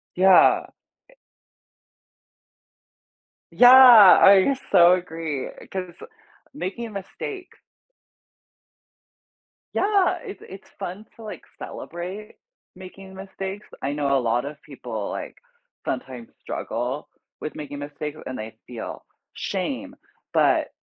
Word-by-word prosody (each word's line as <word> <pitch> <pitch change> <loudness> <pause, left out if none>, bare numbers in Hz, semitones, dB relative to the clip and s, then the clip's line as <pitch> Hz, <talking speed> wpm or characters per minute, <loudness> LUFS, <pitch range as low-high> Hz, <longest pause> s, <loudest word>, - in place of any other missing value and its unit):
Yeah. 190 +1 +5 0.4
E - - -21 2.4
Yeah, 245 - +6 0.5
I 195 +7 +6 0.2
so 175 -2 +7
agree, 165 -6 -4 0.2
'cause 180 -2 -5 0.6
making 190 +8 -5
a 225 - -9
mistake 360 - -7 2.2
Yeah, 400 -2 +2
it's 405 -4 -9
it's 190 +1 -12
fun 190 +5 -6
to, 230 - -13
like, 215 - -8
celebrate 185 +5 -8 0.4
making 190 +1 -12
mistakes, 195 +1 -7
I 140 - -2
know 140 -2 +1
a - - +1
lot 120 +2 0
of 145 0 -8
people, - - -7
like, - - -6 0.5
sometimes 125 - -5
struggle 125 +5 -4 0.3
with 155 - -6
making 145 -1 -7
mistakes, 145 +1 -7
and 130 - -6
they 110 +1 -8
feel 115 -3 -8 0.3
shame, - - -4 0.4
but - - +2
180 Hz, 105 wpm, -23 LUFS, 145-195 Hz, 2.4 s, so